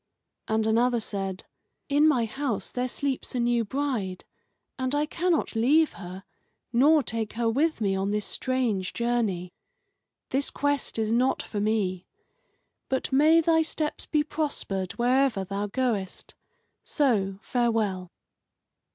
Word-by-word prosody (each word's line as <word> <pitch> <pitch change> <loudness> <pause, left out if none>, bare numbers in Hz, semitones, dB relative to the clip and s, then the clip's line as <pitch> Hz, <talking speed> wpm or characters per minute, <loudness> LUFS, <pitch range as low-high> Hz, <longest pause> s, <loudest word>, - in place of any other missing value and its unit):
And 220 0 +1
another 235 +2 +3
said: 195 -3 -4 0.4
"In 290 +2 +4
my 255 -7 +3
house 245 0 -3
there 250 0 -1
sleeps 265 0 -3
a - - 0
new 240 -1 +2
bride, 225 -7 -3 0.5
and 260 +2 0
I 295 +1 +2
cannot 335 -3 0
leave 295 +8 +3
her 185 0 -9 0.5
nor 290 +5 +5
take 225 -2 -3
her 235 0 0
with 295 +7 +1
me 195 -2 +1
on 195 +1 -1
this 210 0 -1
strange 240 -8 -1
journey. 220 -7 -1 0.8
This 275 +2 0
quest 285 -4 -1
is 220 -1 0
not 250 +3 +2
for 210 - -5
me. 200 -4 0 0.8
But 265 +1 -1
may 310 +5 +5
thy 325 0 +3
steps 310 -1 -2
be 300 -1 +2
prospered 285 - -3
wherever 245 -3 +2
thou 200 +2 -3
goest. 210 -5 -2 0.5
So, 205 -10 +1
farewell." 220 -7 0
235 Hz, 135 wpm, -27 LUFS, 205-280 Hz, 0.8 s, nor